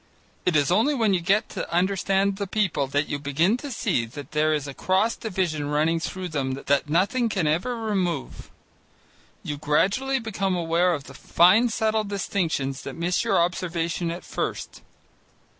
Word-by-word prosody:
It 180 - +3
is 145 +1 +3
only 230 +11 +3
when 220 -6 +2
you 180 - +1
get 200 +5 +2
to - - -5
understand 195 +2 +1
the 200 -1 -3
people 185 -9 0
that 145 +2 0
you 145 - -3
begin 150 +9 +1
to 285 +3 -7
see 120 - 0
that 145 +5 -10
there 155 +1 +2
is 150 -2 -1
a 140 - -6
cross 190 +9 +1
division 175 -8 -2
running 155 +3 +1
through 185 +2 -4
them 135 -4 -2
that 140 +2 0
nothing 200 - +2
can 190 -6 -1
ever 170 +11 0
remove. 190 - -2 0.9
You 145 - -4
gradually 195 - +1
become 195 -5 -2
aware 170 +1 +2
of 145 - -7
fine 180 - +3
subtle 220 -1 0
distinctions 175 -9 -2
that - - -7
miss 175 +2 0
your - - +2
observation 170 -1 -1
at 170 +2 -5
first. - - -4
175 Hz, 165 wpm, -25 LUFS, 150-200 Hz, 0.9 s, It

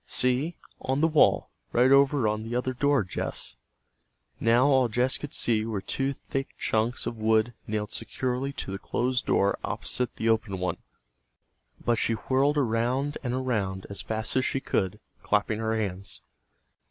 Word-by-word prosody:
"See, 130 +7 +1 0.2
on 135 +1 -1
the 165 - +5
wall, 155 -2 +3 0.2
right 125 +2 +4
over 140 -3 +5
on 105 0 0
the 115 +2 -4
other 125 +1 0
door, 140 -1 +2
Jess." 90 - -4 0.8
Now, 115 +3 +4
all 135 -3 +4
Jess 125 +3 0
could 145 - -6
see 110 -2 +1
were 110 -2 -2
two 135 +7 -1
thick 135 0 -5
chunks 115 +2 0
of 115 - -3
wood 110 +2 +2
nailed 105 -1 -2
securely 130 +2 -2
to 95 - -5
the 95 - -4
closed 125 +4 -1
door 100 +1 +2
opposite 125 -1 -2
the 110 - -2
open 110 -3 +1
one. 90 0 -2 1.1
But 120 -2 +2
she 115 - +1
whirled 135 +6 +1
around 130 +3 0
and 125 -2 -2
around 105 -8 -1
as 100 - -2
fast 110 0 -3
as 130 - +3
she 135 - 0
could, 100 -5 -1 0.2
clapping 105 +1 +1
her 110 0 0
hands. 100 -2 -4
120 Hz, 165 wpm, -27 LUFS, 110-130 Hz, 1.1 s, the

